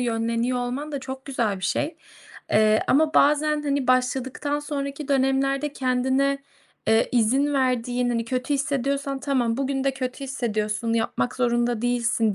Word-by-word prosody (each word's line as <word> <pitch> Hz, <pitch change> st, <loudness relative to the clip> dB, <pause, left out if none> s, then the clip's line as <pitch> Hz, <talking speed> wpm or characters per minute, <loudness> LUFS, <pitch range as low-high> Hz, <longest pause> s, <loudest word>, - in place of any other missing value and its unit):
yönleniyor 230 Hz, +1 st, 0 dB
olman 260 Hz, +5 st, -4 dB
da 280 Hz, -, -2 dB
çok 265 Hz, 0 st, -7 dB
güzel 235 Hz, -7 st, -1 dB
bir 185 Hz, -, -5 dB
şey. 315 Hz, -, -1 dB, 0.5 s
Eee, 215 Hz, 0 st, +4 dB
ama 310 Hz, +3 st, +3 dB
bazen, 300 Hz, +1 st, +3 dB
hani, 280 Hz, -2 st, -1 dB
başladıktan 260 Hz, +3 st, 0 dB
sonraki 285 Hz, -1 st, -4 dB
dönemlerde 275 Hz, +1 st, +1 dB
kendine, 265 Hz, +2 st, +1 dB, 0.5 s
eee, 220 Hz, +1 st, +4 dB
izin 260 Hz, +5 st, +2 dB
verdiğin, 250 Hz, -2 st, +1 dB
hani, 230 Hz, -1 st, 0 dB
kötü 255 Hz, +4 st, -1 dB
hissediyorsan, 275 Hz, 0 st, -1 dB
"Tamam, 250 Hz, -5 st, 0 dB
bugün 270 Hz, 0 st, -1 dB
de 275 Hz, -, +1 dB
kötü 260 Hz, +1 st, -4 dB
hissediyorsun, 225 Hz, -3 st, -2 dB
yapmak 230 Hz, +2 st, -1 dB
zorunda 240 Hz, -2 st, +1 dB
değilsin, 235 Hz, -3 st, +1 dB
260 Hz, 140 wpm, -24 LUFS, 235-275 Hz, 0.5 s, Eee